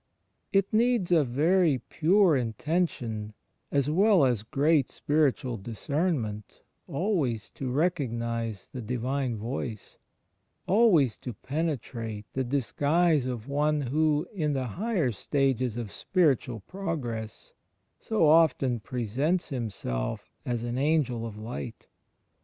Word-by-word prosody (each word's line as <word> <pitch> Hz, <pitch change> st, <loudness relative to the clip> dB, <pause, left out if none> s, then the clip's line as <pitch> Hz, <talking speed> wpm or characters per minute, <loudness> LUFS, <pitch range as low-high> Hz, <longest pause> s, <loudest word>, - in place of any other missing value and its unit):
It 195 Hz, +1 st, +2 dB
needs 230 Hz, -5 st, +2 dB
a 165 Hz, -3 st, +5 dB
very 155 Hz, +4 st, +3 dB
pure 170 Hz, -, +3 dB
intention 115 Hz, -, -2 dB, 0.4 s
as 140 Hz, -1 st, +2 dB
well 185 Hz, +1 st, +4 dB
as 120 Hz, -5 st, +1 dB
great 140 Hz, +5 st, +2 dB
spiritual 145 Hz, -4 st, 0 dB
discernment 115 Hz, -, -3 dB, 0.2 s
always 140 Hz, -, -1 dB
to 130 Hz, -, -5 dB
recognize 115 Hz, -, -1 dB
the 125 Hz, -, -5 dB
Divine 125 Hz, +2 st, -2 dB
Voice; 115 Hz, -1 st, -5 dB, 0.7 s
always 180 Hz, -, +4 dB
to 125 Hz, -, -6 dB
penetrate 120 Hz, -6 st, -4 dB
the 130 Hz, -, 0 dB
disguise 145 Hz, +4 st, +1 dB
of 120 Hz, -2 st, -4 dB
one 150 Hz, +1 st, +1 dB
who, 150 Hz, +4 st, +1 dB
in 155 Hz, -7 st, 0 dB
the 135 Hz, -2 st, -1 dB, 0.2 s
higher 200 Hz, -, +1 dB
stages 130 Hz, +1 st, 0 dB
of 115 Hz, -4 st, -4 dB
spiritual 135 Hz, -, +1 dB
progress, 120 Hz, -, -5 dB, 0.5 s
so 215 Hz, -8 st, +2 dB
often 145 Hz, -6 st, +4 dB
presents 130 Hz, -, -1 dB
himself 100 Hz, -, -4 dB, 0.2 s
as 120 Hz, -2 st, -1 dB
an 120 Hz, +1 st, -3 dB
''Angel 135 Hz, -6 st, +1 dB
of 105 Hz, -2 st, -9 dB
Light." 115 Hz, +1 st, -7 dB
135 Hz, 110 wpm, -28 LUFS, 115-160 Hz, 0.7 s, a